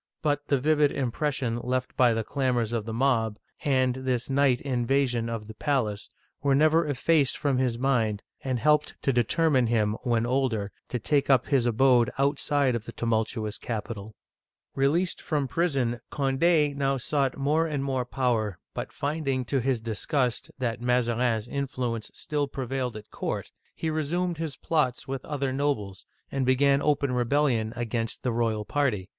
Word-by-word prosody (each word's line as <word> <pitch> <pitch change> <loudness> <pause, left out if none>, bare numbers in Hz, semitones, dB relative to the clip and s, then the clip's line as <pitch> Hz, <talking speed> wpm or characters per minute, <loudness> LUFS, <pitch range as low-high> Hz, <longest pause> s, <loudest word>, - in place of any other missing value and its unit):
But 145 -1 0
the 140 - +2
vivid 150 +1 +3
impression 130 -2 -1
left 130 +1 -2
by 120 -3 +4
the 115 - -1
clamors 125 -3 0
of 115 -3 -1
the - - -3
mob, 115 -3 +1 0.3
and 130 -3 +2
this 130 -1 -2
night 135 -2 +3
invasion 125 -2 0
of 115 -2 -4
the 110 - -9
palace, 110 -5 -1 0.3
were 140 -1 +3
never 155 +2 +4
effaced 145 0 +2
from 140 -3 +1
his 125 -3 0
mind, 115 -5 +1 0.2
and 130 -2 -1
helped 150 +4 +2
to 135 - +2
determine 130 +2 +2
him, 110 -2 +2
when 120 -2 +1
older, 120 -5 0 0.2
to 125 - -1
take 140 +5 +1
up 130 -3 +5
his 130 -4 +2
abode 120 0 +4
outside 140 -1 +2
of 115 -2 -3
the - - -7
tumultuous 110 -1 -1
capital. 110 -2 -5 0.6
Released 155 +7 +1
from 145 -3 -1
prison, 135 -6 0
Cond6 145 +2 +2
now 135 -1 +1
sought 135 +1 0
more 150 +4 +2
and 145 -3 -2
more 130 -2 0
power, 120 -7 -1 0.2
but - - -5
finding, 140 -3 -2
to 135 +3 0
his 130 -1 +1
disgust, 120 +3 -1
that 120 -3 -2
Mazarin's 120 -2 +1
influence 125 -5 -3
still 145 -2 -2
prevailed 130 -2 -3
at 105 -1 -10
court, - - -4 0.2
he 160 - -2
resumed 165 +3 -1
his 160 -5 -3
plots 140 -6 0
with 135 -1 -4
other 140 -3 -2
nobles, 115 -9 -2 0.2
and 135 -1 0
began 140 +2 +3
open 145 -2 +1
rebellion 125 -2 +1
against 115 -1 -3
the 125 - +1
royal 115 -2 0
party. 120 -10 0
130 Hz, 160 wpm, -27 LUFS, 115-140 Hz, 0.6 s, up